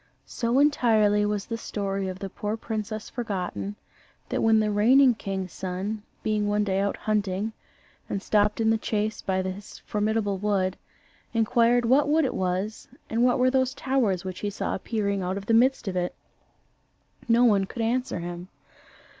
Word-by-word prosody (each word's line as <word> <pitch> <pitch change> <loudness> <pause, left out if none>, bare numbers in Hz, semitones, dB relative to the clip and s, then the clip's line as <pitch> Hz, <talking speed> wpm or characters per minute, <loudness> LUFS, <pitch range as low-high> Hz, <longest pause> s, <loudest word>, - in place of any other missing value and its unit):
So 235 +1 -1
entirely 220 -8 +3
was 205 -1 -2
the 230 -1 -4
story 195 -3 -3
of 185 -1 -5
the 195 0 -6
poor 210 +1 -3
princess 215 -1 -4
forgotten, 200 -3 -4 0.5
that - - -1
when 225 -1 +4
the 215 -1 +1
reigning 250 +5 +5
king's 190 -4 -5
son, 190 +4 -4 0.2
being 210 -1 0
one 210 0 +1
day 195 -1 0
out 200 0 0
hunting 210 0 -1 0.6
and 200 - -1
stopped 210 0 +2
in 225 0 +3
the 225 - +1
chase 215 0 -2
by 190 -1 -1
this 190 +2 -6
formidable 210 -2 0
wood, 195 -2 0 0.6
inquired 235 +1 +3
what 270 +5 +4
wood 310 0 +3
it - - -1
was 190 +4 -2 0.2
and 230 +2 +2
what 245 0 +4
were 255 0 +3
those 260 -1 +1
towers 225 -9 0
which 185 -1 -5
he 205 - -2
saw 205 - -3
appearing 200 -1 -1
out 185 +1 -2
of 200 - -6
the 230 - +1
midst 250 +1 +3
of 190 - -2
it, 180 0 -1 1.1
no 240 +1 +5
one 200 -4 +4
could 230 +4 -4
answer 250 +1 0
him. 175 +1 -6
210 Hz, 170 wpm, -26 LUFS, 195-230 Hz, 1.1 s, reigning